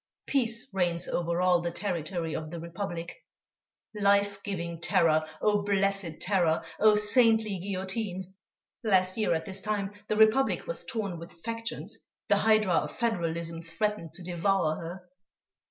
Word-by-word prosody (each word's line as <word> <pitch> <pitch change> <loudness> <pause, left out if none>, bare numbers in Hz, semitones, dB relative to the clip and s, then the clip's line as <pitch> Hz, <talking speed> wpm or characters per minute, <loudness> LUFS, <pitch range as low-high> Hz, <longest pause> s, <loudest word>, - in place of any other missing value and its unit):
Peace 235 -3 0
reigns 175 -2 0
over 170 +1 0
all 180 -1 +4
the 170 - -1
territory 170 -3 -3
of 155 -1 -4
the 170 +1 -6
Republic.... 170 0 -5 0.8
Life 200 -1 +2
giving 170 -5 -4
terror, 155 -2 +3 0.2
oh! 210 -1 +3
blessed 195 -4 0
terror! 175 -5 +2 0.2
oh! 215 0 +6
saintly 220 -1 +4
guillotine! 190 0 -3 0.5
Last 185 -4 +3
year 215 -6 +2
at 160 - -3
this 195 -1 -4
time, 205 -1 -2
the 215 - 0
Republic 220 +5 +4
was - - -3
torn 205 -8 -3
with 170 - -9
factions, 230 0 -4 0.3
the - - +5
hydra 215 -4 +3
of - - 0
Federalism 170 -8 -1
threatened 170 0 -2
to 185 - -9
devour 175 -2 +1
her. 180 +2 -8
190 Hz, 140 wpm, -29 LUFS, 170-210 Hz, 0.8 s, oh